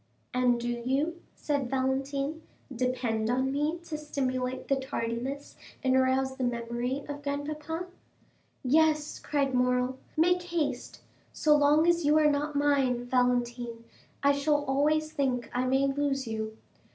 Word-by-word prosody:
"And 250 -1 +3
do 240 - -3 0.2
you," 295 +7 0
said 285 -4 -1
Valentine, 275 +3 -1 0.3
"depend 235 -3 0
on 260 +2 +1
me 295 +4 0
to 310 -3 -5
stimulate 260 -3 -2
the 275 - +2
tardiness 265 +1 -4 0.3
and 260 -1 +3
arouse 260 0 +2
the 260 - -2
memory 240 +3 -2
of 290 0 -6
grandpapa?" 300 +4 -3 0.8
"Yes," 305 +2 +2
cried 280 -3 0
Morrel, 250 +1 +1 0.2
"make 355 +3 +4
haste. 315 -8 -3 0.3
So 300 -1 +4
long 295 +2 +4
as 345 0 +3
you 300 +1 +4
are 300 -1 +5
not 290 +1 -1
mine, 275 -4 +2
Valentine, 245 -2 0 0.4
I 280 - +6
shall 290 +1 +1
always 305 +3 +1
think 260 -6 -1
I 250 +1 0
may 265 +2 +3
lose 275 -1 0
you." 220 0 -4
270 Hz, 140 wpm, -29 LUFS, 250-295 Hz, 0.8 s, I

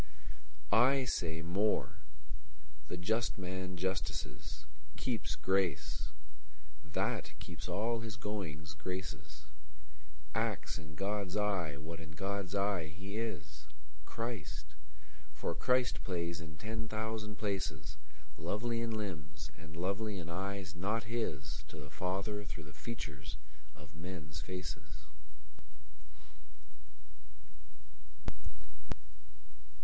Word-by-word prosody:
Í 130 +4 +8
say 80 -6 +2
móre: 100 +5 +3 0.9
the 90 - -1
just 110 +6 +3
man 95 -1 -1
justices; 90 -8 0 0.3
Kéeps 110 -10 +1
gráce: 95 -5 +3 0.7
thát - - +1
keeps - - -5
all 115 +3 +3
his 110 -1 -3
goings 90 -6 -2
graces; 90 -6 -3 0.9
Acts - - +2
in 75 -2 -8
God's 100 0 +1
eye 95 -8 +3
what 80 +3 -4
in 80 -2 -7
God's 95 +2 0
eye 100 -4 +4
he 95 +6 -4
is—Chríst—for 115 -2 -4
Christ 125 -1 +4
plays 85 -2 +1
in 80 -1 -7
ten 110 +3 -1
thousand 110 0 0
places, 95 -10 0 0.4
Lovely 115 +8 +2
in 115 - +1
limbs, 95 -11 -2
and 80 0 -9
lovely 100 +4 +2
in 85 -2 -3
eyes 95 0 -1
not 105 +6 +2
hisTo 95 - -1
the 75 0 -7
Father 100 +3 +1
through 85 -4 -4
the 75 -1 -10
features 75 -10 -3 0.4
of 75 0 -11
men's 80 -3 -4
faces. 90 -2 -4
95 Hz, 95 wpm, -37 LUFS, 80-105 Hz, 0.9 s, Í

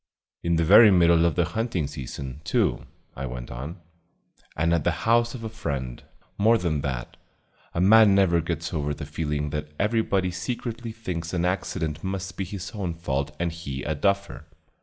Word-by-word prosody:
"In 85 0 +1
the 85 - +2
very 105 +6 +8
middle 85 -3 +5
of 85 - +2
the 85 - +2
hunting 110 -2 -2
season, 70 0 -7
too," - - 0 0.3
I 65 +1 -4
went 60 0 -7
on, 70 +8 -6 0.8
"and 85 +2 +2
at 85 - +1
the 90 +4 -1
house 115 +1 +3
of 115 - -8
a - - -2
friend. 70 - -4 0.4
More 115 +3 +5
than 80 -7 -1
that, 65 -4 -4 0.6
a 85 - +1
man 105 +1 +7
never 90 -4 +4
gets 85 +1 -4
over 75 -2 -1
the - - -6
feeling 75 -2 -2
that 75 0 -4
everybody 100 -4 +1
secretly 115 +5 -4
thinks 90 -7 -5
an 85 0 +1
accident 80 -4 -2
must 95 -1 -4
be 95 - -3
his 95 -1 -6
own 95 -6 -3
fault 75 -3 -3
and 85 0 0
he 70 -5 -6
a 80 - -1
duffer. 100 +6 -1
85 Hz, 180 wpm, -25 LUFS, 75-100 Hz, 0.8 s, very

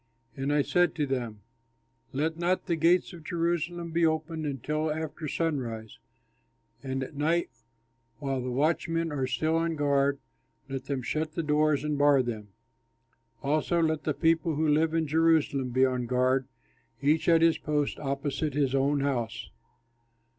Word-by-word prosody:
And 135 0 -2
I 145 -1 +3
said 175 0 +2
to 150 - 0
them, 120 -6 -3 0.7
"Let 155 +4 -1
not 180 +2 0
the 170 - 0
gates 170 +4 +2
of 170 -2 -11
Jerusalem 170 0 -2
be 170 +1 +1
opened 160 0 0
until 150 +3 -2
after 155 0 -4
sunrise; 125 -9 -3 0.8
and 135 -1 -3
at 130 - -8
night, 160 +2 0 0.7
while 135 0 -2
the 125 - -3
watchmen 165 +4 0
are 135 -3 -1
still 155 +6 0
on 165 0 0
guard, 140 -1 +2 0.5
let 135 -1 -5
them 135 -3 -3
shut 155 +4 -2
the 165 - -2
doors 150 -1 +2
and 150 -1 -1
bar 145 -2 +5
them. 110 -4 -5 1.0
Also 155 +4 +1
let 160 -2 +1
the 155 - -1
people 165 -1 +2
who 155 +2 +1
live 155 +2 +2
in 165 -1 +1
Jerusalem 155 -4 +2
be 130 +2 +3
on 125 -2 -1
guard, 130 +1 +1 0.6
each 155 +4 +2
at 165 -1 +5
his 165 -1 +4
post 150 -1 -1
opposite 140 +1 -2
his 140 -3 +1
own 140 +1 +2
house." 120 -5 -2
150 Hz, 155 wpm, -28 LUFS, 135-160 Hz, 1.0 s, bar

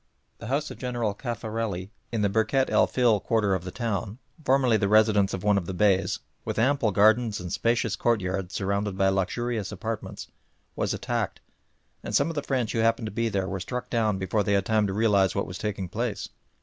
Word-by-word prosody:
The 115 - -7
house 140 +4 -1
of - - -10
General 120 -4 -1
Cafarelli 110 -4 -4 0.2
in 115 -3 0
the - - +4
Birket 110 +6 +1
el - - +4
Fil 120 -5 +3
quarter 105 -2 +1
of 95 -2 -1
the 90 - -5
town, 100 0 -3 0.3
formerly 130 -4 +3
the 105 -2 +2
residence 105 -2 +4
of 95 - -4
one 105 -1 +3
of 85 - -8
the 95 - -4
Beys, 95 -2 +2 0.3
with - - -4
ample 130 0 +2
gardens 110 +2 +3
and 90 -1 -5
spacious 115 -2 +1
courtyards 95 -6 -1
surrounded 100 0 -1
by 95 0 +3
luxurious 105 +3 -1
apartments, 115 -1 -5 0.5
was - - -1
attacked, - - -2 0.6
and - - -3
some 140 +3 +3
of - - -3
the 145 - -1
French 130 -5 -1
who 115 - -1
happened 115 0 +2
to 105 - -4
be 115 +2 0
there 95 -2 -1
were 95 0 -3
struck 125 +7 -5
down 110 -4 +1
before 95 +3 0
they 100 - 0
had 100 -2 +2
time 110 -2 +2
to - - -2
realise 100 -3 +3
what - - 0
was 90 0 -7
taking 100 -3 -3
place. - - -3
105 Hz, 205 wpm, -26 LUFS, 95-115 Hz, 0.6 s, the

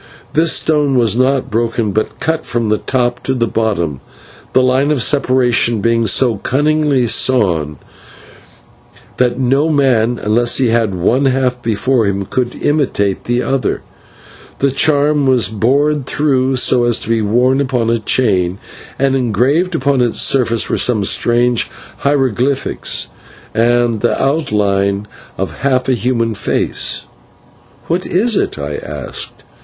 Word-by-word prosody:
This 160 +1 +2
stone 150 -3 +1
was 115 -3 +2
not 130 +1 0
broken, 115 -1 -1
but 110 +2 -3
cut 160 0 -1
from 120 -3 -2
the 110 - +1
top 120 -2 -1
to 130 - -2
the 120 -2 +1
bottom, 100 - -2 0.5
the 130 - +4
line 130 +3 +2
of 145 -6 +2
separation 125 -5 +1
being 115 +2 +1
so 115 +3 +2
cunningly 145 +2 +1
sawn 95 - +1 1.4
that 125 -1 +1
no 135 +5 +1
man, 125 -6 +2
unless 120 +3 +1
he 130 -3 +2
had 115 -4 0
one 120 +10 +1
half 130 -2 0
before 115 +1 0
him, 100 0 -2
could 125 +4 -2
imitate 130 -10 0
the 120 +1 0
other. 135 -1 -2 0.7
The 140 0 +1
charm 145 0 +2
was 125 -6 +2
bored 135 +6 0
through 135 -3 0
so 125 -1 +3
as 120 -2 +2
to - - -8
be 115 -1 +1
worn 125 +6 +2
upon 125 -4 0
a 115 - 0
chain, 95 -6 +1 0.4
and 135 0 +1
engraved 135 - +1
upon 140 -3 +1
its 120 -2 0
surface 115 -4 +2
were - - -1
some 115 -5 +2
strange 120 +3 +1 0.3
hieroglyphics 135 -1 -1 0.5
and 120 -1 +1
the 120 - 0
outline 105 -8 0 0.3
of - - -4
half 130 -2 0
a 130 - +2
human 115 -2 -1
face. 100 - -2 0.8
"What 175 +2 -2
is 220 +5 +1
it?" - - -1
I 70 0 -4
asked. - - -6
125 Hz, 140 wpm, -15 LUFS, 115-135 Hz, 1.4 s, the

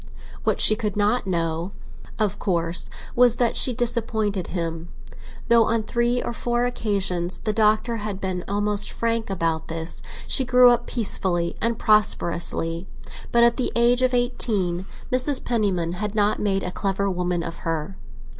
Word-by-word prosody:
What - - +1
she 215 - +7
could 210 -2 -3
not 210 +2 +1
know, 170 +1 -2 0.4
of 205 -2 -1
course, 170 -3 -1 0.3
was 245 -1 +5
that 240 -2 +1
she 255 - +4
disappointed 220 -5 -1
him, 165 -1 -4 0.6
though 235 -1 +5
on 225 0 0
three 240 +2 0
or - - -4
four 240 +1 -1
occasions 195 -7 -1
the 215 - -1
Doctor 220 +2 +2
had 210 -2 -5
been 185 -2 -3
almost 205 0 +1
frank 230 -1 -1
about 165 -4 -2
it. 165 +1 -3 0.3
She 265 - +3
grew 250 -1 +6
up 240 - 0
peacefully 185 -6 0
and 230 0 0
prosperously, 170 -5 0 0.4
but 235 0 +4
at 235 0 +4
the 255 - -1
age 240 +1 +3
of 255 -1 +2
eighteen 200 -7 0 0.2
Mrs. 255 +2 +3
Penniman 195 -8 0
had 205 +4 -4
not 210 0 +1
made 195 -2 0
a 180 - -3
clever 195 +1 -2
woman 180 -2 -1
of 165 0 -6
her. 165 +2 -4
205 Hz, 155 wpm, -23 LUFS, 180-235 Hz, 0.6 s, she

